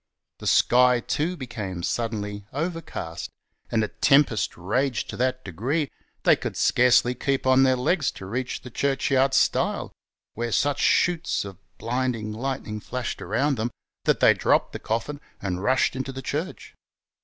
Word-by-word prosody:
The - - -5
sky, 125 0 +5
too, 160 +8 -2
became 100 - -5
suddenly 105 -2 -3
overcast, 160 - -4 0.4
and 110 -2 +1
a - - 0
tempest 135 - +3
raged 120 +8 -1
to - - -7
that 130 +1 -1
degree, 130 - -2 0.3
they - - +6
coidd - - -5
scarcely 125 0 +4
keep 135 +2 -1
on 130 0 +5
their 130 -1 +4
legs 140 +4 +1
to 95 - -9
reach 125 +6 -3
the 125 - -10
churchyard 135 0 +1
stile, - - +1 0.4
where 120 +1 -3
such 145 +5 +1
sheets 175 -10 +2
of 95 -2 -9 0.2
blinding 115 -2 -2
lightning 120 -2 -4
flashed 125 +3 -5
around 140 -1 0
them, 110 +2 -1 0.4
that - - +2
they - - +7
dropped - - +1
the - - -5
coffin 130 +7 -3 0.2
and 95 -2 -3
rushed 130 +4 +2
into 130 +1 -3
the 135 0 -7
church. 155 +8 -4
125 Hz, 155 wpm, -25 LUFS, 110-135 Hz, 0.4 s, they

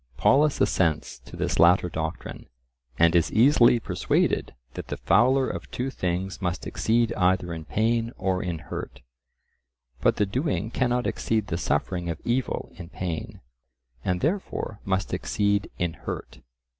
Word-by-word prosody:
Polus 145 +1 +3
assents 80 -8 +1
to 60 - -13
this - - -2
latter 90 +2 +5
doctrine, 80 -1 -5 0.5
and 85 0 +4
is 85 - +3
easily 120 0 +5
persuaded - - 0 0.2
that - - -7
the - - -4
fouler 130 +6 +3
of - - -6
two 130 +2 -3
things 90 -1 -3
must 90 -1 -2
exceed 115 +1 +1
either 90 -2 +1
in 80 -1 -7
pain 115 +5 0
or 95 -1 0
in 85 -2 -3
hurt. 75 - -7 1.0
But - - +3
the 105 - +2
doing 120 - -2
cannot 125 0 0
exceed 110 -2 0
the 85 - -1
suffering 85 +3 -1
of 85 -1 -3
evil 125 +2 -1
in 85 -3 -9
pain, 90 -3 -5 0.6
and 90 -1 -1
therefore 155 - -2
must 95 -1 -1
exceed 100 0 0
in 85 -2 -1
hurt. - - -7
95 Hz, 145 wpm, -26 LUFS, 85-120 Hz, 1.0 s, latter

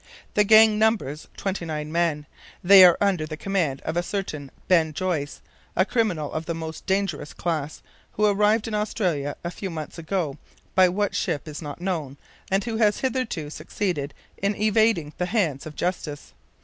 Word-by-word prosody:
The 210 - +4
gang 215 0 +6
numbers 215 -10 0
twenty 195 -2 -3
nine 155 -2 -4
men; 165 -3 0 0.4
they 190 +1 +9
are 175 -2 +7
under 185 -6 +1
the 155 0 -6
command 165 -8 -1
of 160 - -4
a 175 - +2
certain 155 -6 -4 0.2
Ben 165 -4 +3
Joyce, 165 -4 -2 0.3
a 185 - +3
criminal 185 - -1
of 160 0 -4
the 170 - -2
most 160 -1 -7
dangerous 190 -7 -1
class, 155 -3 -3 0.3
who 210 - +1
arrived 210 +2 +3
in 225 - -5
Australia 180 -9 -1
a 170 - -3
few 195 +1 -5
months 160 0 -6
ago, 165 -4 -2 0.3
by 185 -1 +6
what 205 +2 -1
ship 145 - -2
is 155 +1 -7
not 150 +2 -7
known, 160 -7 -3 0.3
and 195 +1 +1
who 230 -2 -3
has 210 -2 +2
hitherto 255 - -2
succeeded 155 -3 -3 0.2
in 200 +1 0
evading 215 -7 +2
the 180 - 0
hands 175 - 0
of 150 - -9
justice. 150 - -4
175 Hz, 175 wpm, -24 LUFS, 155-205 Hz, 0.4 s, they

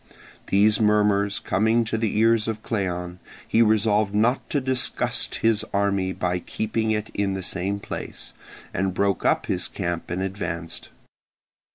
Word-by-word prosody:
These 105 +2 +4
murmurs 105 -1 +3
coming 110 +4 +2
to 110 - -2
the 110 -2 -1
ears 115 0 +3
of 110 -1 -3
Cleon, 90 -4 -3 0.3
he 115 - +3
resolved 105 -2 +3
not 120 +5 +1
to 145 - +1
disgust 130 -1 -1
the 115 -2 +3
army 100 -2 +1
by 90 -1 -1
keeping 110 +4 -2
it 110 0 -1
in 100 -1 0
the 95 - -4
same 95 +2 -2
place, - - -7 0.4
and 95 0 -1
broke 100 0 0
up - - +2
his - - -1
camp 85 -2 -4
and 90 +2 -2
advanced. 85 -4 -4
100 Hz, 150 wpm, -24 LUFS, 95-110 Hz, 0.4 s, These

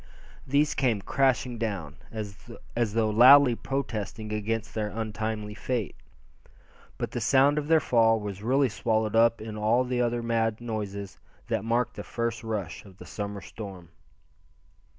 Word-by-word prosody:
These 145 +3 +2
came 120 -7 +1
crashing 130 -2 +1
down, 95 -9 -4
as 110 +1 -5
though 110 -1 +2
loudly 130 +4 +8
protesting 110 -4 -4
against 110 +1 -2
their 110 -1 -1
untimely 110 -1 -4
fate. 120 0 -3 1.0
But - - -3
the - - -3
sound 140 +2 +4
of 145 - -5
their 160 0 +5
fall 115 -5 +3
was 100 -2 -6
really 135 +5 +2
swallowed 110 -1 0
up 115 0 +4
in 110 0 -7
all 110 +4 +2
the 125 -1 -1
other 120 0 0
mad 115 -1 0
noises 100 -4 -5 0.3
that - - 0
marked 120 +1 0
the 105 - -5
first 115 0 -3
rush 105 -7 -4
of 95 -3 -16
the - - -11
summer 100 -1 -5
storm. 95 -6 -9
115 Hz, 150 wpm, -27 LUFS, 105-120 Hz, 1.0 s, loudly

